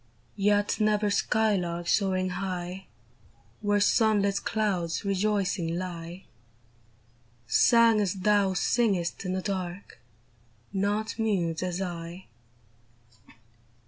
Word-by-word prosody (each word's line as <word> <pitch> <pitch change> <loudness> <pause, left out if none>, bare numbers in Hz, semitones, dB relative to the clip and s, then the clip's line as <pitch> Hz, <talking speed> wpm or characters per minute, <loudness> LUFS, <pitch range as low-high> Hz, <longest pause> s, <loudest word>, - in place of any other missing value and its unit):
Yet 205 +1 +1
never 210 -1 +2
skylark 190 -6 0
soaring 185 -2 +1
high 185 0 -5 0.7
Where 205 -1 +2
sun 215 0 +3
lit 200 0 0
clouds 190 -6 -1
rejoicing 195 -4 0
lie. 175 0 -6 1.2
Sang 230 - +4
as 200 -2 -1
thou 195 0 +2
singest 195 -4 0
in 185 - -2
the 185 0 -3
dark, 185 -1 -5 0.7
Not 205 +3 -1
mute 180 -7 0
as 185 +1 -2
I 175 0 -7
195 Hz, 95 wpm, -27 LUFS, 180-210 Hz, 1.2 s, Sang